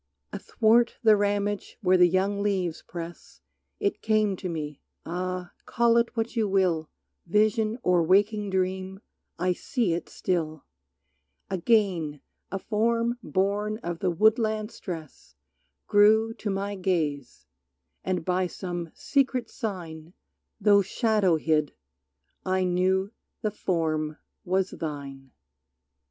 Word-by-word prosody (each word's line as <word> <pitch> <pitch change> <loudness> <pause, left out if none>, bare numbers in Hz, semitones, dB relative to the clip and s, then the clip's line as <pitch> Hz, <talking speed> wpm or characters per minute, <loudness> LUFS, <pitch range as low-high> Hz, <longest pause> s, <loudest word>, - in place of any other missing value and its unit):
Athwart 230 +1 +2
the 220 -2 +7
ramage 205 0 -1
where 185 0 +4
the 180 -1 +6
young 195 +3 +1
leaves 185 -5 -1
press 170 0 -9 0.4
It 400 -2 -1
came 215 -2 +2
to 185 - -5
me, 150 -3 -5 0.2
ah, 180 +1 -4 0.2
call 235 0 +3
it 235 0 +1
what 225 +2 -2
you 225 -2 +1
will 180 -5 +1 0.4
Vision 215 +3 +2
or 180 -1 +3
waking 205 +4 +2
dream, 190 +1 -2 0.4
I 180 +2 +1
see 225 -1 -1
it 170 - -4
still! 155 -4 -2 0.9
Again 185 -6 +1 0.3
a 195 - -1
form 230 +3 0
born 205 +1 0
of 170 -1 -4
the 185 - +1
woodland 215 +3 +2
stress 155 - -9 0.5
Grew 220 +2 +4
to 220 - -5
my 200 +1 -2
gaze, 160 -8 -2 0.6
and 185 -3 -2
by 185 0 +1
some 175 -2 -5
secret 260 -4 0
sign 170 - -6 0.5
Though 205 -1 +5
shadow 205 -3 +2
hid, 155 -2 0 0.7
I 185 0 +1
knew 185 +2 +1 0.3
the 215 - 0
form 155 -6 -1 0.3
was 190 +1 0
thine. 140 -4 -6
190 Hz, 120 wpm, -27 LUFS, 170-215 Hz, 0.9 s, the